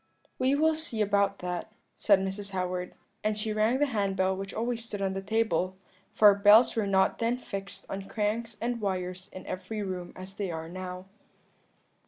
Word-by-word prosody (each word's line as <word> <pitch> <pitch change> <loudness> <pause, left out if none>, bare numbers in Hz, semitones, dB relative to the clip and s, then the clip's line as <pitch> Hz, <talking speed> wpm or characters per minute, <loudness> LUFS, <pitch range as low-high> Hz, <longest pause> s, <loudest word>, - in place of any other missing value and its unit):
"'We 260 +2 +3
will 315 +2 +4
see 310 -8 -3
about 200 -1 +2
that,' 180 +4 -3 0.2
said 200 -2 +5
Mrs. 195 +1 -3
Howard; 180 -1 -2 0.3
and 215 0 0
she 215 0 -1
rang 215 +4 +2
the 290 - +3
hand 205 -7 -1
bell 190 0 +2
which 195 +1 -5
always 235 +1 -2
stood 210 -3 -6
on 195 -1 0
the 195 - -3
table, 205 -3 0 0.3
for 210 -1 +7
bells 205 +4 +6
were 220 -3 0
not 190 -1 +2
then 235 +1 +1
fixed 195 -5 -6
on 195 0 -6
cranks 220 +1 -1
and 235 0 -2
wires 185 -1 -3
in 185 - -9
every 195 +3 -4
room 180 -2 -4
as 185 +1 -9
they 195 -1 -3
are 160 -1 -4
now. 185 +1 -6
200 Hz, 185 wpm, -29 LUFS, 190-220 Hz, 0.3 s, for